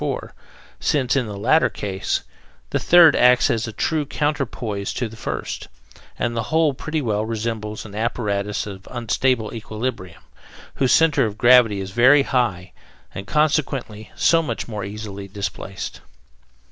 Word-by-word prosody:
4), -, -, -3 dB, 0.5 s
since, 135 Hz, -4 st, +1 dB
in 130 Hz, -4 st, 0 dB
the 105 Hz, -1 st, -6 dB
latter 130 Hz, +6 st, +3 dB
case, 95 Hz, -3 st, -3 dB, 0.5 s
the -, -, +1 dB
third 175 Hz, -2 st, +7 dB
acts 125 Hz, 0 st, +5 dB
as 115 Hz, +1 st, -1 dB
a -, -, -5 dB
true 155 Hz, +7 st, -1 dB
counter 145 Hz, -1 st, -1 dB
poise 105 Hz, -5 st, -4 dB
to 120 Hz, -, -1 dB
the 110 Hz, -, -12 dB
first, 115 Hz, -, -5 dB, 0.5 s
and 120 Hz, -1 st, -1 dB
the 115 Hz, -, 0 dB
whole 160 Hz, -2 st, +3 dB
pretty 150 Hz, +3 st, -3 dB
well 105 Hz, -3 st, 0 dB
resembles 110 Hz, -1 st, -4 dB
an 105 Hz, -, -11 dB
apparatus 105 Hz, -2 st, -2 dB
of 95 Hz, -2 st, -9 dB
unstable 120 Hz, -1 st, 0 dB
equilibrium, 110 Hz, -5 st, -5 dB, 0.5 s
whose 130 Hz, -2 st, +2 dB
centre 160 Hz, -7 st, +4 dB
of 105 Hz, 0 st, -7 dB
gravity 120 Hz, -4 st, +5 dB
is 95 Hz, 0 st, -5 dB
very 130 Hz, +6 st, +5 dB
high 110 Hz, -10 st, -1 dB, 0.4 s
and, 100 Hz, -, -7 dB
consequently, 140 Hz, -8 st, -1 dB
so 165 Hz, -1 st, +4 dB
much 160 Hz, -, -4 dB
more 105 Hz, -3 st, -5 dB
easily 100 Hz, -1 st, -7 dB
displaced. 100 Hz, -1 st, -6 dB
115 Hz, 150 wpm, -21 LUFS, 105-130 Hz, 0.5 s, third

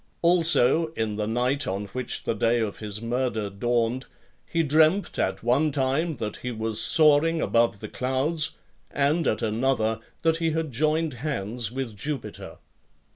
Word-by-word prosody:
Also, 165 Hz, -3 st, +4 dB
in 110 Hz, -6 st, -2 dB
the 105 Hz, -1 st, -2 dB
night 125 Hz, +5 st, 0 dB
on 100 Hz, +2 st, -3 dB
which 125 Hz, +5 st, -4 dB
the -, -, -1 dB
day 115 Hz, +1 st, +1 dB
of 110 Hz, -3 st, -3 dB
his 105 Hz, 0 st, -4 dB
murder 115 Hz, -3 st, -2 dB
dawned, 120 Hz, +4 st, -1 dB, 0.4 s
he 165 Hz, -1 st, 0 dB
dreamt 160 Hz, +5 st, +2 dB
at 95 Hz, +2 st, -1 dB
one 135 Hz, +6 st, +2 dB
time 140 Hz, +4 st, 0 dB
that 110 Hz, -4 st, -5 dB
he 125 Hz, -, -5 dB
was 110 Hz, -1 st, -1 dB
soaring 160 Hz, +1 st, +5 dB
above 115 Hz, -7 st, +1 dB
the 110 Hz, -, -5 dB
clouds, 140 Hz, +7 st, -1 dB, 0.3 s
and, 145 Hz, +3 st, +1 dB
at 110 Hz, -, 0 dB
another, 110 Hz, 0 st, 0 dB, 0.2 s
that 165 Hz, 0 st, +2 dB
he 165 Hz, 0 st, 0 dB
had 160 Hz, -2 st, -2 dB
joined 155 Hz, +4 st, 0 dB
hands 115 Hz, -5 st, -2 dB
with 130 Hz, -4 st, -5 dB
Jupiter. 140 Hz, +3 st, -6 dB
130 Hz, 155 wpm, -25 LUFS, 110-155 Hz, 0.4 s, soaring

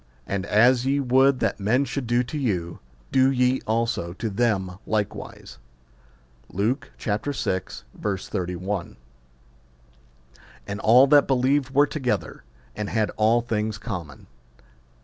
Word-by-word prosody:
And 100 Hz, 0 st, -3 dB
as 120 Hz, +4 st, +4 dB
ye 135 Hz, +2 st, +1 dB
would 130 Hz, 0 st, +3 dB
that -, -, 0 dB
men 120 Hz, +8 st, +2 dB
should 135 Hz, -1 st, -4 dB
do 120 Hz, +1 st, +2 dB
to 125 Hz, -, -8 dB
you, 95 Hz, -, -2 dB, 0.3 s
do 130 Hz, 0 st, +4 dB
ye 125 Hz, 0 st, +1 dB
also 115 Hz, -6 st, -1 dB
to 110 Hz, +3 st, -4 dB
them 95 Hz, -4 st, -1 dB
likewise. 105 Hz, -2 st, -4 dB, 0.9 s
Luke 110 Hz, +9 st, -1 dB
vi. 105 Hz, -2 st, -1 dB
31. 95 Hz, -, -4 dB, 1.7 s
And 100 Hz, +1 st, -5 dB
all 125 Hz, +5 st, +6 dB
that 145 Hz, 0 st, +5 dB
believed 135 Hz, +1 st, +2 dB
were 145 Hz, +1 st, +6 dB
together, 125 Hz, -, -3 dB, 0.3 s
and 105 Hz, -1 st, -4 dB
had 110 Hz, -2 st, 0 dB
all 110 Hz, +2 st, +3 dB
things 110 Hz, -2 st, -2 dB
common. 90 Hz, -, -7 dB
115 Hz, 120 wpm, -24 LUFS, 100-130 Hz, 1.7 s, all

